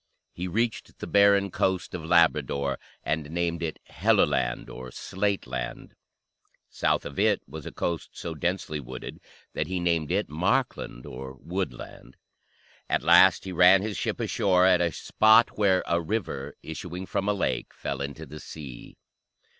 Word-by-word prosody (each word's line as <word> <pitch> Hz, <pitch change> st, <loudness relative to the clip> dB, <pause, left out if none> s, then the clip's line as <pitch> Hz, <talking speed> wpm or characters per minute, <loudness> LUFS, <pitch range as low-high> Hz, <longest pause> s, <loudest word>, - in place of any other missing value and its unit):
He 90 Hz, +1 st, -4 dB
reached 115 Hz, +5 st, -2 dB
the -, -, -6 dB
barren 100 Hz, -1 st, +4 dB
coast 95 Hz, -1 st, -1 dB
of 90 Hz, -3 st, -5 dB
Labrador 75 Hz, -5 st, +2 dB, 0.2 s
and 75 Hz, -1 st, -2 dB
named 85 Hz, 0 st, -1 dB
it 80 Hz, -2 st, -3 dB
Helluland, -, -, +1 dB
or 65 Hz, 0 st, -8 dB
"slate 100 Hz, +9 st, -2 dB
land;" 60 Hz, -1 st, -5 dB, 0.8 s
south -, -, 0 dB
of -, -, -6 dB
it -, -, +3 dB
was 75 Hz, +2 st, -8 dB
a -, -, -6 dB
coast 85 Hz, -3 st, -3 dB
so 85 Hz, -, -5 dB
densely 85 Hz, -1 st, -2 dB
wooded 65 Hz, -2 st, -8 dB, 0.3 s
that -, -, -2 dB
he 95 Hz, -1 st, -2 dB
named 85 Hz, -4 st, 0 dB
it -, -, +1 dB
Markland, 75 Hz, -5 st, -1 dB
or 65 Hz, +1 st, -8 dB
"woodland." 80 Hz, 0 st, -6 dB, 0.7 s
At -, -, +1 dB
last 95 Hz, -2 st, +6 dB
he 95 Hz, -, -6 dB
ran 90 Hz, +2 st, +6 dB
his 105 Hz, -1 st, -3 dB
ship -, -, -2 dB
ashore 90 Hz, -2 st, +2 dB
at 90 Hz, -2 st, +5 dB
a 85 Hz, -1 st, +1 dB
spot 110 Hz, +6 st, +4 dB
where 95 Hz, -3 st, +3 dB
"a 85 Hz, 0 st, +1 dB
river, 80 Hz, -7 st, -3 dB
issuing 90 Hz, +3 st, -6 dB
from 100 Hz, +2 st, -1 dB
a -, -, +3 dB
lake, -, -, -1 dB
fell 70 Hz, -1 st, -5 dB
into 70 Hz, +3 st, -5 dB
the 75 Hz, 0 st, -10 dB
sea." 70 Hz, -7 st, -10 dB
85 Hz, 155 wpm, -27 LUFS, 75-95 Hz, 0.8 s, last